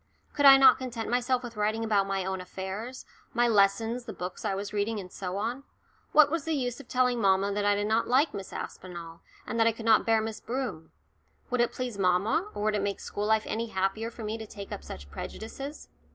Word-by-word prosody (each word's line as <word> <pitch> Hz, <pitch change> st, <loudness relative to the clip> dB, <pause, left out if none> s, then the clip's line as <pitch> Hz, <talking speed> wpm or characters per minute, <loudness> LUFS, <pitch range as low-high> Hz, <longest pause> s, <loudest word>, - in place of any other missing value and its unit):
Could 285 Hz, -1 st, +5 dB
I 270 Hz, 0 st, +11 dB
not 265 Hz, -1 st, +7 dB
content 235 Hz, -3 st, -4 dB
myself 250 Hz, +1 st, +1 dB
with 235 Hz, -1 st, -7 dB
writing 215 Hz, +2 st, 0 dB
about 205 Hz, -3 st, +2 dB
my 195 Hz, -1 st, -1 dB
own 190 Hz, -1 st, -2 dB
affairs 195 Hz, +7 st, -6 dB, 0.3 s
my 240 Hz, 0 st, +4 dB
lessons, 225 Hz, +3 st, +2 dB
the 220 Hz, -, -6 dB
books 180 Hz, 0 st, -6 dB
I 205 Hz, -3 st, 0 dB
was 200 Hz, +1 st, -5 dB
reading, 210 Hz, +1 st, 0 dB
and 180 Hz, -2 st, -9 dB
so 185 Hz, -1 st, -4 dB
on? 235 Hz, +6 st, -2 dB, 0.5 s
What 300 Hz, -2 st, +6 dB
was 330 Hz, -2 st, -1 dB
the 320 Hz, 0 st, -1 dB
use 245 Hz, -3 st, -2 dB
of -, -, -12 dB
telling 250 Hz, -2 st, +1 dB
mamma 195 Hz, 0 st, +3 dB
that 205 Hz, 0 st, -1 dB
I 205 Hz, 0 st, +4 dB
did 205 Hz, 0 st, -1 dB
not 220 Hz, +2 st, +1 dB
like 265 Hz, +6 st, +3 dB
Miss 195 Hz, -1 st, -6 dB
Aspinall, 170 Hz, -2 st, -7 dB, 0.2 s
and 230 Hz, -, -3 dB
that 225 Hz, -, +5 dB
I -, -, +5 dB
could 225 Hz, 0 st, -9 dB
not 220 Hz, -1 st, +5 dB
bear 225 Hz, -1 st, +4 dB
Miss 220 Hz, 0 st, -4 dB
Broom? 235 Hz, -11 st, -4 dB, 0.6 s
Would 250 Hz, -1 st, +2 dB
it 240 Hz, -, +2 dB
please 245 Hz, -5 st, -4 dB
mamma, 200 Hz, -, +2 dB
or 205 Hz, -, -3 dB
would 215 Hz, 0 st, +2 dB
it 205 Hz, -, 0 dB
make 200 Hz, 0 st, -2 dB
school 205 Hz, +1 st, -3 dB
life 220 Hz, 0 st, +3 dB
any 230 Hz, +2 st, -2 dB
happier 195 Hz, +3 st, -1 dB
for 230 Hz, -1 st, -9 dB
me 215 Hz, +1 st, -3 dB
to 220 Hz, -, -7 dB
take 200 Hz, -1 st, -9 dB
up -, -, -6 dB
such 70 Hz, +2 st, -9 dB
prejudices? 270 Hz, -, -7 dB
220 Hz, 230 wpm, -28 LUFS, 195-245 Hz, 0.6 s, I